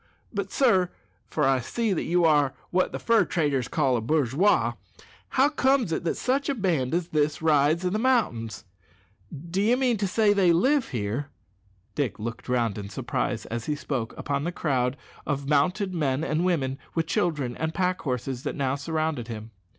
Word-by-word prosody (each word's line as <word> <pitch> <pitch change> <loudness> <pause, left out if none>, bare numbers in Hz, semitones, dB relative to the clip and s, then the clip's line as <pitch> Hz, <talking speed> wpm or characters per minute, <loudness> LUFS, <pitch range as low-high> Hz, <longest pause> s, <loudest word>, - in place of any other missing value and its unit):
But, 200 -2 -3
sir 190 -10 +3 0.4
(for 150 - -1
I 135 -1 +3
see 225 - -2
you 175 -2 +1
are 145 -4 +3 0.2
what 185 +1 +2
the - - -3
fur 230 -1 +3
traders 145 -7 0
call 135 -5 +1
a 115 - 0
bourgeois), 150 - +2 0.6
how 270 +2 +3
comes 265 - +2
it 160 - -1
that 165 - 0
such 270 +3 0
a 280 - +1
band 165 - 0
as 175 -1 -1
this 150 -1 +1
rides 155 +2 +3
i' - - +2
the 210 +4 -1
mountains? 120 - 0 0.7
D'ye 185 - 0
mean 250 -3 +1
to 200 0 0
say 210 +2 +2
that 205 - +4
they 185 -3 +5
live 265 - +3
here?" 120 +4 -2 0.7
Dick 135 -8 -1
looked 115 +2 -6
round 115 -5 0
in 100 -1 -7
surprise, 120 0 -2
as 115 0 -5
he 150 - 0
spoke, 130 -5 -4
upon 140 0 -2
the 170 - -1
crowd 130 -6 0 0.3
of 140 0 -2
mounted 180 +7 +1
men 145 -4 0
and 160 +1 0
women, 135 -7 0 0.2
with 165 -1 +1
children 145 -7 -1
and 160 0 -2
pack 185 -1 0
horses, 130 -1 -3
that 145 - -4
now 135 -2 0
surrounded 155 -3 -2
him. 110 -1 -7
155 Hz, 180 wpm, -26 LUFS, 130-185 Hz, 0.7 s, they